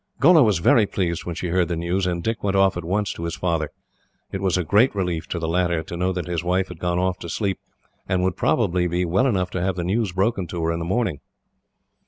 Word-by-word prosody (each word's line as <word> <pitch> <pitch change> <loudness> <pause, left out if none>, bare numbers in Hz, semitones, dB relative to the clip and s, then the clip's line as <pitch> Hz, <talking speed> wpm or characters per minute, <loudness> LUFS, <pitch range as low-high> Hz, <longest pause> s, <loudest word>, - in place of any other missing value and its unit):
Gholla 160 +3 +7
was 105 -6 +3
very 110 +5 +4
pleased 85 -4 -2
when 85 - -4
she 90 - -3
heard 90 0 +2
the 85 - -2
news, 90 +3 -1
and 85 -1 -2
Dick 115 0 -2
went 100 -1 +1
off 95 -1 +4
at 90 - -4
once 100 +4 -1
to 85 - -7
his 85 - -3
father. 85 -4 -1 0.6
It 95 - -4
was 95 -2 +1
a 90 - 0
great 105 - +3
relief, 90 -4 -2
to - - -3
the 80 -1 -2
latter, 85 -1 +1
to 85 - -7
know 90 +2 0
that 90 -3 -3
his 85 -1 -2
wife 90 +2 0
had - - -9
gone 90 0 -1
off 90 0 0
to 85 - -7
sleep, 95 +2 -2 0.5
and 95 -1 +1
would 90 -1 0
probably 90 0 +1
be 90 +1 0
well 95 +10 +2
enough 95 -7 0
to 90 - -2
have 95 0 0
the 90 - -3
news 100 +3 0
broken 95 0 0
to 85 -1 -4
her 80 - +1
in 85 - -2
the 85 - -3
morning. 95 - -1
90 Hz, 260 wpm, -23 LUFS, 85-95 Hz, 0.6 s, Gholla